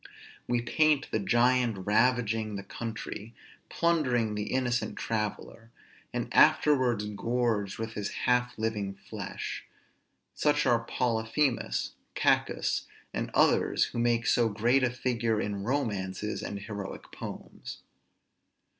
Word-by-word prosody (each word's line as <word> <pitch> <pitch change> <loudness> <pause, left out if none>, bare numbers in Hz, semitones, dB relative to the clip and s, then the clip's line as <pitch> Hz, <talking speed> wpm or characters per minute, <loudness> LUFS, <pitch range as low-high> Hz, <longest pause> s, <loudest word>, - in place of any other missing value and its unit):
We 120 -1 +1
paint 150 +4 +3
the 110 - +1
giant 120 -1 +2
ravaging 110 -1 +2
the 100 - -5
country, 110 0 -6 0.3
plundering 130 -10 +1
the 105 0 -3
innocent 125 -2 0
traveller, 110 +1 -3 0.4
and - - -2
afterwards 125 -7 +4
gorged 105 -1 -1
with 115 0 -4
his 105 -1 -3 0.2
half 125 0 +2
living 105 -3 -2
flesh: - - -6 0.7
such 150 -1 +2
are 120 -3 +4
Polyphemus, 115 +3 0 0.2
Cacus, - - +1 0.3
and - - -2
others, - - +4
who - - -3
make 120 0 +2
so 115 -1 +3
great 120 +6 +2
a 125 - +3
figure 120 -3 0
in 100 -2 -2
romances 105 -5 -2
and 100 0 -5
heroic 100 -1 -7
poems. - - -8
115 Hz, 115 wpm, -29 LUFS, 105-125 Hz, 0.7 s, afterwards